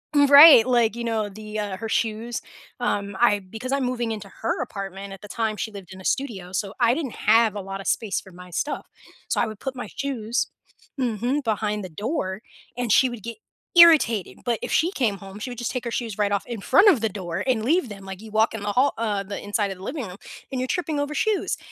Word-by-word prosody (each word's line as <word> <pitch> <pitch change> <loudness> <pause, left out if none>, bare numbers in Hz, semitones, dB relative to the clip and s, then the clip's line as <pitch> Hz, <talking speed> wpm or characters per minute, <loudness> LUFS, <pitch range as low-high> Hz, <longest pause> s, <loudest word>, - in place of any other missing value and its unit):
Right, 285 -3 +9
like, 235 -3 +2
you 235 - -4
know, 225 -2 -1
the, 215 +1 -7
uh, 205 -2 -3
her 225 +2 -5
shoes, 225 +1 -1 0.4
um 200 -5 -1
I 205 -4 +4
because 225 +8 -6
I'm 275 - +1
moving 245 -2 -1
into 205 -2 -8
her 225 - -1
apartment 195 0 -6
at 195 - -10
the 205 - -10
time 220 -1 -2
she - - -3
lived 195 -2 -10
in 190 - -11
a - - -13
studio. 200 -10 -2
So 195 +1 -2
I 235 0 +4
didn't 290 -6 -3 0.2
have 220 -1 +5
a 205 - -3
lot 195 +1 -6
of - - -8
space 215 -4 0
for 190 - -15
my 180 +1 -12
stuff. 290 - -3 0.4
So - - +1
I - - +2
would 215 -2 -8
put 265 -1 -4
my 245 - -6
shoes 245 -3 -2 0.5
mhm, 250 +4 0
behind 210 -2 -1
the 185 - -6
door, 205 - -3 0.4
and 245 -1 -2
she 255 +5 +5
would 240 -3 -8
get 230 -1 -6 0.4
irritated. 315 - +6
But 235 -2 +1
if - - -4
she 335 - +3
came 225 - 0
home, 195 0 -10
she 250 +3 -5
would 245 - -8
just 240 - -2
take 250 -2 -4
her 235 - -3
shoes 225 -3 -3
right 205 -1 +1
off 200 - 0
in 235 -4 -5
front 380 - +6
of 290 - +4
the 225 - +1
door 185 -2 -4
and 245 -4 +1
leave 300 +2 +2
them 195 -2 -10
like 190 +1 -8
you 220 - -11
walk 220 +1 +2
in 215 - -6
the 205 - -1
hall 260 +5 +3
uh, 210 -3 -1
the 200 +1 -6
inside 205 0 -1
of 195 - -6
the 185 - -12
living 260 -2 -4
room 180 - -10 0.3
and 260 - -2
you're 255 - -1
tripping 315 -2 -1
over 285 +1 -2
shoes. 425 +6 0
220 Hz, 245 wpm, -24 LUFS, 200-250 Hz, 0.5 s, Right